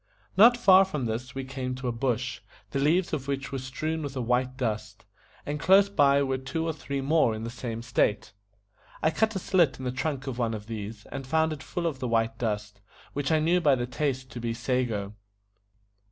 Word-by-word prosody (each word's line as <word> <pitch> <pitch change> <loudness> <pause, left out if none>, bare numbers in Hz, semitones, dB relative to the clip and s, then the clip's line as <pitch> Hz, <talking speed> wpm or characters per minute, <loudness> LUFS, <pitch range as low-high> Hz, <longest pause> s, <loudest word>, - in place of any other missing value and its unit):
Not 235 +4 +7
far 190 -5 +7
from 150 -9 -3
this 120 +3 -4
we 135 - -3
came 130 -1 -4
to 125 0 -5
a - - +1
bush, 125 +1 -2 0.3
the 140 - -1
leaves 165 +6 +2
of 135 -1 -2
which 140 -1 -3
were 135 - -3
strewn 155 +5 -3
with 140 -2 -5
a - - -2
white 125 +2 0
dust; 110 -4 -3 0.4
and 150 +1 -3
close 195 +4 +5
by 140 -6 +4
were 135 -1 -1
two 160 +5 -3
or 165 - -1
three 140 -2 -4
more 140 -5 +3
in 110 - -6
the 115 - -4
same 120 -2 -5
state. 110 -3 0 0.7
I 155 - +4
cut 220 +6 +1
a - - +1
slit 180 -6 +2
in 130 - -7
the 125 - 0
trunk 135 +1 -3
of 130 -3 -4
one 115 -2 0
of 105 -1 -8
these, 105 -1 -6
and 135 -1 -6
found 160 +2 +2
it 145 - -8
full 175 -1 -4
of 155 -6 -1
the 130 - -2
white 115 -1 0
dust, 105 -3 -3 0.3
which 145 0 -1
I 160 - +5
knew 170 +3 +2
by 145 -5 +5
the 120 -1 -2
taste 130 0 -2
to 120 - -6
be 115 -1 -2
SA 125 +2 0
GO. 105 -3 -4
130 Hz, 225 wpm, -27 LUFS, 120-155 Hz, 0.7 s, Not